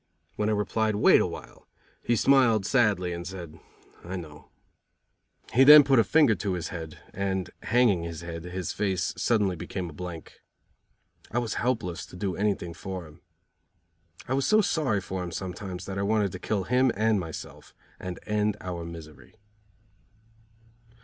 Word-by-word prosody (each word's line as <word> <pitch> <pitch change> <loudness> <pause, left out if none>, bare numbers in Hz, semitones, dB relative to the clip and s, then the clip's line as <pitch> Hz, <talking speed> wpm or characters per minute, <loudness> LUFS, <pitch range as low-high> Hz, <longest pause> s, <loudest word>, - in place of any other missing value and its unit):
When 105 0 0
I - - +2
replied: 110 +1 0
"Wait 105 - +6
awhile," - - -6 0.3
he 120 - +1
smiled 115 -5 +4
sadly, 105 -8 +2
and 85 0 -6
said: 85 -4 -8 0.4
"I 90 +3 -6
know." 75 -5 -9 1.0
He 130 - +6
then 150 +2 +10
put 135 -3 +4
his 115 - +3
finger 150 -7 +5
to 100 -1 -2
his 85 -2 -3
head, 80 -4 -7 0.2
and, 95 -1 -2
hanging 115 -7 +3
his 85 -1 -6
head, 85 0 -7
his 90 +1 -4
face 95 -3 -1
suddenly 105 -6 +1
became 85 +1 -5
a - - -13
blank. 85 -1 -8 0.9
I 115 - -3
was 120 -2 -1
helpless 95 -8 -2
to - - -13
do 95 -1 -3
anything 100 -4 -1
for 95 0 -6
him. 80 +3 -16 1.1
I 130 - -1
was 135 0 +1
so 215 - +5
sorry 145 - +1
for 95 0 -5
him 90 - -4
sometimes 90 +1 -6
that 95 0 -4
I - - 0
wanted 105 -1 +1
to 90 - -7
kill 100 0 -1
him 125 +4 +3
and 110 0 +2
myself 80 -4 -8 0.2
and 90 -2 -6
end 105 0 0
our 90 -2 -5
misery. 80 +1 -11
95 Hz, 165 wpm, -27 LUFS, 90-110 Hz, 1.1 s, then